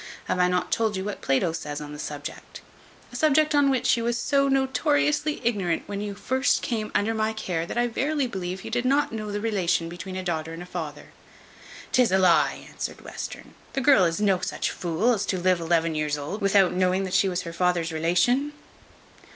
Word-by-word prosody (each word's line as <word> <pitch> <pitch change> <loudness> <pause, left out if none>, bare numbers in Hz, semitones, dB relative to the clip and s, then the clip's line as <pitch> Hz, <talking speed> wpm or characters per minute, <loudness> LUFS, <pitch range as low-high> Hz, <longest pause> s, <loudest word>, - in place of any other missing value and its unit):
Have - - -1
I 180 - +4
not 180 0 -1
told 220 -3 +1
you 190 - -3
what 210 - -5
Plato 135 +5 +1
says 150 -2 -5
on 150 0 -8
that 150 - -9
subject? 145 -1 -7 0.5
a - - -11
subject 305 +2 +3
on 285 -1 +4
which 260 -3 +2
you 230 - -3
was 235 0 0
so 275 +3 +2
notoriously 290 +3 +1
ignorant 190 -8 0
when 200 0 -5
you 205 -1 -4
came - - -17
first 260 +2 +1 0.3
under 220 +2 +2
my 220 0 0
care, 175 -6 -3
that - - -5
I 240 - +3
verily 275 +5 0
believe 185 -5 -5
you - - -6
did 245 - 0
not 275 +3 +2
know 215 -2 -4
the 205 - -2
relation 185 -6 0
between 175 +2 -7
a 185 - -4
daughter 165 -2 -3
and 165 +2 -7
a - - -10
father." 160 -5 -6 0.8
"'Tis 250 -5 +3
a 190 - +4
lie," 175 -5 +3
answered - - -6
Western. - - -8 0.2
"The 270 - -1
girl 270 -7 +6
is 165 +2 0
no 195 -3 +2
such 180 - -2
fool, 180 +8 +1
as 205 -3 -1
to 190 - 0
live 180 0 +2
to 165 - -5
eleven 165 -1 +2
years 150 -1 -1
old 150 +9 -5
without 195 -2 +4
knowing 185 +1 +1
that 185 -1 -4
she 195 - +3
was 180 -1 -2
her 170 - -7
father's 175 -1 0
relation." 180 - +1
190 Hz, 215 wpm, -25 LUFS, 170-240 Hz, 0.8 s, girl